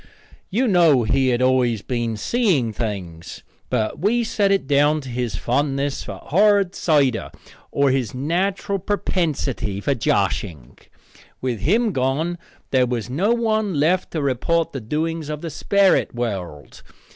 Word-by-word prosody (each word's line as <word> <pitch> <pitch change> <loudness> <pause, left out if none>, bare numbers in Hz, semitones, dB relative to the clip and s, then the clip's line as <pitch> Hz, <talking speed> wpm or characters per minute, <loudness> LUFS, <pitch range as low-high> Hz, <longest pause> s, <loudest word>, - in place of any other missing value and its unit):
You 245 +7 +1
know 170 - +4
he 130 +4 +1
had 125 0 +1
always 125 -4 +2
been 120 -3 -2
seeing 160 - +1
things, 95 -7 -6 0.3
but 110 +5 -1
we 225 +7 +2
set 205 -3 +1
it 195 -6 +1
down 145 +2 +3
to 135 - -9
his 120 -4 -3
fondness 140 +5 -1
for - - -7
hard 200 +1 +3
cider 140 -8 +1 0.4
or 140 -1 +2
his 130 -5 -1
natural 185 +8 -1
prepensity 155 - -2
for 140 +7 0
joshing. 85 - -2 0.6
With 125 -4 -2
him 220 - +2
gone 150 +5 -1 0.3
there 130 -2 +3
was 120 -1 -3
no 185 - +1
one 220 -5 0
left 175 +5 +2
to 155 -3 -1
report 155 +5 0
the 135 - -5
doings 155 +6 -3
of 150 -1 -4
the 165 - -5
sperrit 200 -7 +2
world. 95 - -5
140 Hz, 145 wpm, -21 LUFS, 120-180 Hz, 0.6 s, know